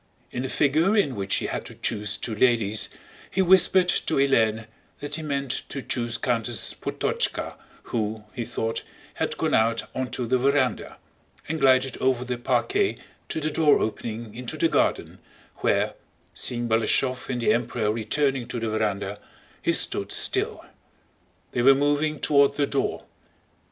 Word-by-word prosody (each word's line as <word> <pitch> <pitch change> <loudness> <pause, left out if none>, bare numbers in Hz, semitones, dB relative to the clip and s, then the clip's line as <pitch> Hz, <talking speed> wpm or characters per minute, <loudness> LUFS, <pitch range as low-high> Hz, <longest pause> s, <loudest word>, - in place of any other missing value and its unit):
In 125 - -3
the 130 - -3
figure 160 +11 +2
in 145 -10 +2
which 100 -1 -1
he - - -1
had - - -3
to - - -11
choose 105 -3 -1
two 115 - -4
ladies, 110 -2 +2 0.4
he 190 - +1
whispered 185 0 +5
to 165 - 0
Hélène 115 -5 +2 0.3
that 145 0 -6
he 160 - -1
meant 140 -4 -2
to 135 - -5
choose 120 -2 -1
Countess 120 -5 -1
Potocka - - -2 0.3
who, 110 -1 -3
he 120 - -3
thought, 115 0 -3 0.3
had - - -2
gone - - 0
out 115 +1 +2
onto 130 -1 -3
the 130 +2 +1
veranda, 135 -2 +1 0.5
and 160 +1 -2
glided 130 -1 +3
over 130 -1 +1
the 125 -1 -3
parquet 390 - +1 0.3
to - - -2
the 155 0 -2
door 150 -1 +4
opening 110 0 -4
into 120 +1 -6
the - - +3
garden, - - 0 0.4
where, - - +1 0.4
seeing 120 -1 -2
Balashëv 120 +4 +1
and 125 -2 -1
the 120 - +3
Emperor 115 -2 0
returning 125 +4 0
to 120 - -4
the 115 -1 -2
veranda, 105 -2 -1 0.4
he - - +2
stood - - +1
still. - - 0 0.9
They 120 - 0
were 135 +2 +7
moving 145 +2 +1
toward 140 -1 +4
the 145 - +2
door. 140 -1 -2
125 Hz, 155 wpm, -25 LUFS, 115-140 Hz, 0.9 s, were